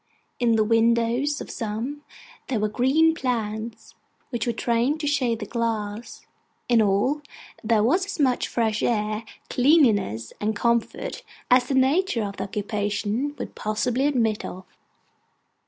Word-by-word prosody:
In 240 -2 +3
the 220 - +3
windows 235 +5 +2
of - - -7
some, 230 +6 -4 0.5
there 245 -5 -1
were 215 - +1
green 270 +9 +3
plants, 225 -5 -3 0.4
which 240 -2 -2
were - - +2
trained 235 +6 0
to - - -2
shade 260 -5 +1
the 215 - -6
glass; 225 -1 -3 0.4
in 235 -2 +4
all, 215 +9 +2 0.4
there 215 -1 +3
was 360 - +2
as 400 -3 -6
much 260 -4 +2
fresh 220 -3 0
air, 215 -1 0 0.3
cleanliness, 230 - +3
and 215 +1 0
comfort, 235 +2 -1 0.3
as 250 0 +6
the 270 - 0
nature 265 - +2
of 200 -1 -5
the 195 - -3
occupation 210 +6 -2
would - - -6
possibly 240 +5 0
admit 225 -7 +1
of. 185 +1 -7
230 Hz, 140 wpm, -24 LUFS, 215-265 Hz, 0.5 s, as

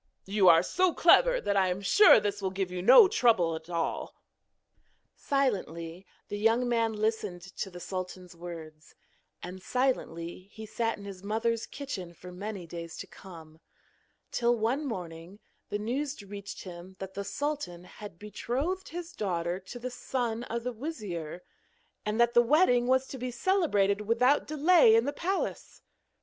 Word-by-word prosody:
You 195 -2 +4
are 165 0 +7
so 365 - +1
clever - - +5
that 200 - -1
I 190 -1 +3
am 180 +1 -1
sure 410 - +7
this 205 0 -3
will 190 - 0
give 190 -1 -3
you 180 0 -4
no 410 - +9
trouble 225 - +3
at 160 +1 -9
all.' 170 -1 -3 1.0
Silently 185 - -2 0.2
the 205 - -5
young 225 +3 +3
man 230 -2 +1
listened 210 -4 -2
to 195 0 -6
the 180 -1 -10
sultan's 185 0 -6
words, 160 -3 -10 0.5
and 185 +1 -7
silently 185 -8 -2
he 220 +1 -9
sat 225 +1 -2
in 200 - -11
his 195 -2 -8
mother's 225 +3 -1
kitchen 190 -12 -7
for 180 +1 -11
many 195 0 -6
days 170 0 -8
to - - -6
come, 160 -4 -13 0.7
till, 240 0 +2
one 250 +7 0
morning, 175 -3 -7 0.3
the 205 - -1
news 265 +7 -3
reached 200 0 -8
him 180 0 -10
that 190 0 -7
the 200 - -4
sultan 275 - -4
had 190 0 -11
betrothed 270 - -3
his 350 +1 -7
daughter 175 - -2
to 195 +6 -10
the 250 +1 -5
son 245 -2 -3
of 235 +1 -4
the 250 0 -3
wizir, 205 - -6 0.6
and 210 +2 -1
that 235 0 +4
the 240 - +7
wedding 245 -2 +3
was 260 +1 +3
to 265 - -8
be 250 +1 -3
celebrated 235 - +1
without 245 +6 +2
delay 305 -5 +5
in 230 +1 +3
the 285 - -2
palace. 380 +6 -3
210 Hz, 160 wpm, -29 LUFS, 180-250 Hz, 1.0 s, no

